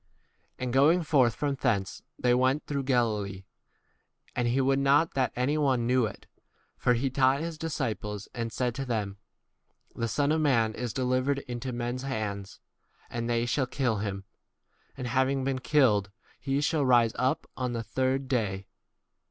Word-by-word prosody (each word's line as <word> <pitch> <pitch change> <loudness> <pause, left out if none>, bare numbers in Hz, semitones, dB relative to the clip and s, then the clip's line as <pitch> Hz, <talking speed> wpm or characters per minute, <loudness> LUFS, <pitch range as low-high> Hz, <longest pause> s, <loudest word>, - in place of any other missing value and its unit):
30 - - -6
And 125 -1 -2
going 155 +7 +5
forth 130 -7 +3
from 145 -1 -1
thence 110 -8 -1 0.2
they 125 -1 +2
went 130 +4 +2
through 140 -1 -2
Galilee; 110 -7 0 0.9
and 125 -1 +1
he 120 +3 +1
would 135 +1 +2
not 140 +4 +3
that 130 -3 +1
any 140 +5 +1
one 130 -5 +2
knew 125 0 +3
31 105 - -6
it; - - -23 0.5
for 125 - +2
he 130 +4 0
taught 135 +1 +3
his 165 0 -4
disciples 110 -10 -3
and 115 -2 -3
said 125 0 -1
to 135 - -4
them, 105 -6 -2 0.8
The 115 - -2
Son 145 +5 +1
of 160 0 +2
man 115 -7 +2
is 120 0 -4
delivered 130 +2 0
into 125 +1 -4
men's 120 +1 -3
hands; 105 -7 -4 0.5
and 120 0 -3
they 120 0 +1
shall 130 +2 0
kill 120 -4 0
him, 100 -1 -3 0.7
and, 130 - -4
having 130 +2 +1
been 135 -1 -1
killed, 125 -8 +3 0.3
he 135 +1 -1
shall 150 0 +1
rise 120 -3 +4
up 135 +5 0
on 125 -1 -2
32 - - -2
the - - -31
third 130 +1 0
day. 105 -7 -1
130 Hz, 175 wpm, -28 LUFS, 115-135 Hz, 0.9 s, going